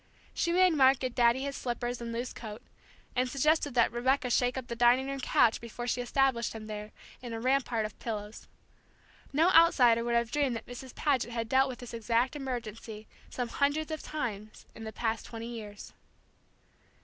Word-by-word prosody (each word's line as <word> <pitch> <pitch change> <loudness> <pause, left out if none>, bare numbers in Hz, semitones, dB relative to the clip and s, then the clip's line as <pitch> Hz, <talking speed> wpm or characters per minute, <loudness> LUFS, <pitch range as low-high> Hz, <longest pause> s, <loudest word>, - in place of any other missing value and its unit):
She 340 - 0
made 365 +1 +5
Mark 270 -2 +5
get 255 -1 -3
Daddy 240 +1 +3
his 280 0 -3
slippers 245 0 -3
and 235 0 -5
loose 240 +2 -4
coat, 220 +1 -8 0.5
and 255 0 +1
suggested 290 0 +1
that 235 - +4
Rebecca 250 +1 +1
shake 245 +1 +2
up 260 - -4
the 235 - -5
dining 240 +3 +4
room 275 0 -4
couch 235 -3 +3
before 235 +1 -6
she 245 0 -1
established 245 -1 +1
him 220 -1 -8
there, 210 0 -7 0.3
in 240 -2 -6
a 225 - -4
rampart 250 -3 +1
of 215 - -8
pillows. 210 -1 -6 0.8
No 320 +6 +4
outsider 250 -9 +6
would 235 0 0
have 235 -1 +1
dreamed 285 -5 +1
that 225 - -6
Mrs. 245 +1 -9
Paget 265 -5 +1
had 230 -1 -3
dealt 265 +3 +3
with 250 - -6
this 245 -1 -10
exact 230 +4 0
emergency 225 -5 -6 0.2
some 245 -2 -3
hundreds 290 +5 0
of 315 - -4
times 215 -8 -5
in 225 - -9
the 220 - -5
past 225 +1 -2
twenty 230 -1 -7
years. 210 -3 -9
245 Hz, 185 wpm, -30 LUFS, 230-270 Hz, 0.8 s, outsider